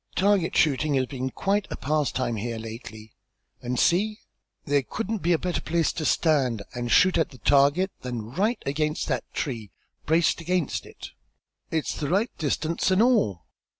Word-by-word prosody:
Target 195 Hz, -3 st, +2 dB
shooting 150 Hz, -1 st, +2 dB
has 130 Hz, -1 st, +2 dB
been 130 Hz, 0 st, -4 dB
quite 200 Hz, +8 st, -1 dB
a -, -, -4 dB
pastime 135 Hz, -5 st, 0 dB
here 115 Hz, +2 st, -3 dB
lately. 110 Hz, -1 st, -9 dB, 0.5 s
And 125 Hz, +1 st, -3 dB
see! 210 Hz, -, +2 dB, 0.4 s
There 145 Hz, 0 st, +2 dB
couldn't 220 Hz, -, -3 dB
be 175 Hz, 0 st, 0 dB
a 170 Hz, -, +4 dB
better 180 Hz, +1 st, -2 dB
place 165 Hz, -1 st, 0 dB
to 155 Hz, -, -4 dB
stand 135 Hz, -12 st, +2 dB
and 120 Hz, -1 st, -3 dB
shoot 185 Hz, -2 st, +5 dB
at 160 Hz, -, +1 dB
that 130 Hz, -6 st, -17 dB
target, 145 Hz, +7 st, +4 dB
than 120 Hz, -3 st, -5 dB
right 210 Hz, -, +1 dB
against 150 Hz, +2 st, -1 dB
that -, -, -2 dB
tree, 115 Hz, -8 st, -4 dB, 0.4 s
braced 165 Hz, +1 st, +2 dB
against 175 Hz, -2 st, -1 dB
it. -, -, -11 dB, 0.6 s
It's 160 Hz, -2 st, -1 dB
the 145 Hz, -, -3 dB
right 205 Hz, +7 st, +1 dB
distance 155 Hz, +3 st, 0 dB
and 190 Hz, +3 st, +4 dB
all. 210 Hz, -, +2 dB
150 Hz, 165 wpm, -26 LUFS, 125-180 Hz, 0.6 s, shoot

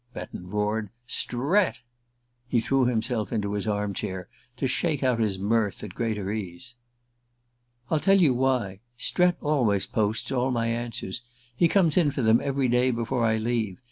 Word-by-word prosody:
Betton 90 Hz, 0 st, -7 dB
roared. 105 Hz, +1 st, -1 dB
"_ -, -, -25 dB, 0.2 s
Strett?_" 140 Hz, -, +1 dB, 0.7 s
He 125 Hz, -1 st, +2 dB
threw 135 Hz, +3 st, +2 dB
himself 115 Hz, -3 st, -1 dB
into 105 Hz, -3 st, -1 dB
his 105 Hz, +1 st, -2 dB
arm 105 Hz, -1 st, -1 dB
chair 95 Hz, -1 st, -5 dB, 0.3 s
to 135 Hz, -, -1 dB
shake 145 Hz, +2 st, 0 dB
out 125 Hz, -3 st, +2 dB
his 105 Hz, -4 st, +1 dB
mirth 105 Hz, +1 st, 0 dB
at 105 Hz, -4 st, -7 dB
greater 105 Hz, -4 st, -2 dB
ease. 105 Hz, +3 st, -6 dB, 1.2 s
"I'll 160 Hz, -, +3 dB
tell 195 Hz, +4 st, +4 dB
you 155 Hz, -8 st, +5 dB
why. 125 Hz, -7 st, 0 dB, 0.2 s
Strett 180 Hz, +7 st, +2 dB
always 125 Hz, -10 st, +2 dB
posts 110 Hz, +3 st, -1 dB
all 130 Hz, 0 st, +1 dB
my 120 Hz, -2 st, 0 dB
answers. 115 Hz, -3 st, -3 dB, 0.3 s
He 170 Hz, -, +4 dB
comes 170 Hz, -3 st, +3 dB
in 165 Hz, -5 st, +4 dB
for 135 Hz, -2 st, -2 dB
them 110 Hz, +1 st, +5 dB
every 135 Hz, -1 st, 0 dB
day 125 Hz, +1 st, +3 dB
before 120 Hz, +1 st, -1 dB
I 110 Hz, -1 st, +3 dB
leave. 110 Hz, -4 st, -1 dB
115 Hz, 170 wpm, -26 LUFS, 105-130 Hz, 1.2 s, you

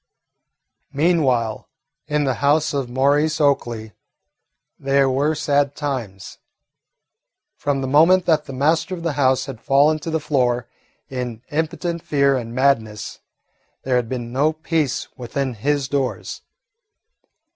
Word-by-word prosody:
Meanwhile 135 Hz, -8 st, +1 dB, 0.4 s
in 150 Hz, -1 st, +1 dB
the 135 Hz, -2 st, +1 dB
house 150 Hz, +2 st, +2 dB
of 135 Hz, -3 st, -2 dB
Maurice 145 Hz, +5 st, +2 dB
Oakley 120 Hz, -7 st, 0 dB, 0.9 s
there 135 Hz, 0 st, +2 dB
were 140 Hz, +4 st, +1 dB
sad 145 Hz, -1 st, +1 dB
times. 120 Hz, -10 st, -5 dB, 1.2 s
From 140 Hz, -1 st, -1 dB
the 130 Hz, -, -2 dB
moment 165 Hz, +7 st, +5 dB
that 155 Hz, -3 st, +2 dB
the 135 Hz, -, -8 dB
master 160 Hz, +6 st, +1 dB
of 170 Hz, -, -9 dB
the 165 Hz, -3 st, -1 dB
house 130 Hz, -2 st, +2 dB
had 135 Hz, -5 st, -8 dB
fallen 145 Hz, +3 st, +3 dB
to 160 Hz, -, -6 dB
the 160 Hz, 0 st, 0 dB
floor 125 Hz, -5 st, 0 dB, 0.4 s
in 125 Hz, -3 st, -5 dB
impotent 165 Hz, +2 st, -2 dB
fear 140 Hz, -2 st, +2 dB
and 120 Hz, -2 st, -5 dB
madness 115 Hz, -6 st, 0 dB, 0.6 s
there 130 Hz, -1 st, +1 dB
had 120 Hz, -2 st, -2 dB
been 120 Hz, -2 st, -5 dB
no 150 Hz, +4 st, +2 dB
peace 155 Hz, -3 st, -1 dB
within 130 Hz, +1 st, -3 dB
his 140 Hz, +5 st, -1 dB
doors. 135 Hz, -3 st, -3 dB
140 Hz, 130 wpm, -21 LUFS, 125-150 Hz, 1.2 s, moment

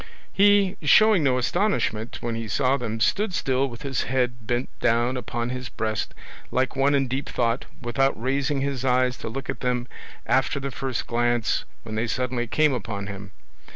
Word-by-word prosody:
He, 200 Hz, -1 st, +4 dB
showing 205 Hz, +4 st, +6 dB
no 130 Hz, -3 st, +3 dB
astonishment 125 Hz, -, 0 dB
when 120 Hz, -1 st, -1 dB
he 115 Hz, 0 st, -4 dB
saw 130 Hz, +5 st, +2 dB
them, 115 Hz, -4 st, -3 dB
stood 200 Hz, -, +1 dB
still 135 Hz, -1 st, +1 dB
with 120 Hz, +2 st, -10 dB
his 135 Hz, -3 st, -1 dB
head 125 Hz, -2 st, -1 dB
bent 120 Hz, +1 st, 0 dB
down 120 Hz, +2 st, +2 dB
upon 120 Hz, 0 st, -3 dB
his 125 Hz, -1 st, -5 dB
breast 110 Hz, -1 st, -3 dB, 0.3 s
like 130 Hz, +1 st, 0 dB
one 140 Hz, +2 st, +3 dB
in 135 Hz, -1 st, +2 dB
deep 130 Hz, +3 st, -3 dB
thought, 115 Hz, -2 st, 0 dB, 0.2 s
without 135 Hz, +1 st, +1 dB
raising 135 Hz, +3 st, 0 dB
his 135 Hz, -2 st, -2 dB
eyes 125 Hz, -1 st, +2 dB
to -, -, -5 dB
look 135 Hz, +4 st, -5 dB
at -, -, -4 dB
them 125 Hz, -1 st, -1 dB, 0.4 s
after 135 Hz, +2 st, +2 dB
the 140 Hz, 0 st, -4 dB
first 130 Hz, 0 st, -3 dB
glance 120 Hz, -1 st, +1 dB, 0.2 s
when 110 Hz, -, -7 dB
they 110 Hz, +2 st, -1 dB
suddenly 125 Hz, 0 st, -1 dB
came 155 Hz, +3 st, +3 dB
upon 105 Hz, -4 st, -4 dB
him. 100 Hz, -1 st, -7 dB
125 Hz, 180 wpm, -25 LUFS, 120-135 Hz, 0.4 s, showing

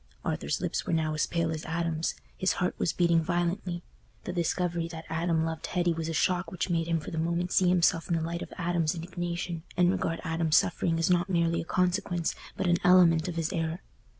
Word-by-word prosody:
Arthur's -, -, -1 dB
lips -, -, -2 dB
were 175 Hz, -, 0 dB
now 160 Hz, -1 st, +1 dB
as 155 Hz, -, 0 dB
pale 170 Hz, -1 st, 0 dB
as 155 Hz, -1 st, -4 dB
Adam's; 165 Hz, -1 st, -1 dB, 0.2 s
his 185 Hz, -, +1 dB
heart 180 Hz, -, 0 dB
was 165 Hz, -, +1 dB
beating 170 Hz, -2 st, +3 dB
violently. 175 Hz, +1 st, -1 dB, 0.4 s
The 180 Hz, -, -4 dB
discovery 170 Hz, -1 st, 0 dB
that 165 Hz, -1 st, -8 dB
Adam 165 Hz, 0 st, +1 dB
loved 160 Hz, -1 st, -4 dB
Hetty 175 Hz, -1 st, +1 dB
was 165 Hz, 0 st, -3 dB
a -, -, -2 dB
shock 175 Hz, +1 st, +1 dB
which 185 Hz, 0 st, -2 dB
made 165 Hz, -1 st, +1 dB
him 165 Hz, -1 st, +1 dB
for -, -, -8 dB
the 160 Hz, -, -2 dB
moment 170 Hz, +2 st, -1 dB
see 185 Hz, -2 st, +4 dB
himself 175 Hz, -1 st, +2 dB
in 170 Hz, -, +2 dB
the 165 Hz, -, 0 dB
light 170 Hz, +1 st, -3 dB
of -, -, -7 dB
Adam's 170 Hz, -2 st, 0 dB
indignation, 175 Hz, 0 st, -4 dB, 0.2 s
and 180 Hz, 0 st, +5 dB
regard 165 Hz, -3 st, -1 dB
Adam's 165 Hz, -2 st, +2 dB
suffering 165 Hz, -1 st, +1 dB
as 165 Hz, +2 st, +1 dB
not 175 Hz, +1 st, +2 dB
merely 170 Hz, -2 st, +1 dB
a -, -, -7 dB
consequence, 180 Hz, -1 st, 0 dB, 0.2 s
but -, -, -1 dB
an 175 Hz, -1 st, +3 dB
element 175 Hz, -2 st, +5 dB
of 175 Hz, -, -4 dB
his 165 Hz, -1 st, -1 dB
error. 165 Hz, +1 st, -2 dB
170 Hz, 215 wpm, -29 LUFS, 165-175 Hz, 0.4 s, and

